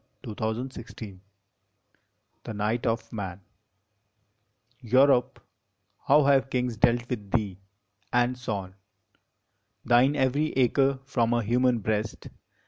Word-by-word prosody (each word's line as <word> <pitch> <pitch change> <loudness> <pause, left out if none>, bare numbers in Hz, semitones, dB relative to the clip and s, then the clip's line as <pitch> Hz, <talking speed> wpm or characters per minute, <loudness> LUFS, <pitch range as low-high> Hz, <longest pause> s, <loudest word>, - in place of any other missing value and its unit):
ON 110 - -6
THE 110 +1 -2
GREAT 120 0 -8
WAR 95 -3 -12 1.3
THE - - -5
NIGHT 105 +3 -1
OF 115 0 -2
MAN 95 -3 -5 1.4
Europe, 130 +1 +3 0.7
how 145 +2 +6
have 135 -1 +3
kings 125 -2 -1
dealt 120 +2 +2
with 105 -6 -5
thee, 100 -4 -1 0.5
and 120 +1 +2
sown 100 -7 -5 1.1
Thine 125 +4 +4
every 140 +3 +1
acre 135 +2 +2
from 120 -4 0
a 120 - 0
human 120 +1 +2
breast 110 +1 -3
120 Hz, 115 wpm, -27 LUFS, 110-130 Hz, 1.4 s, how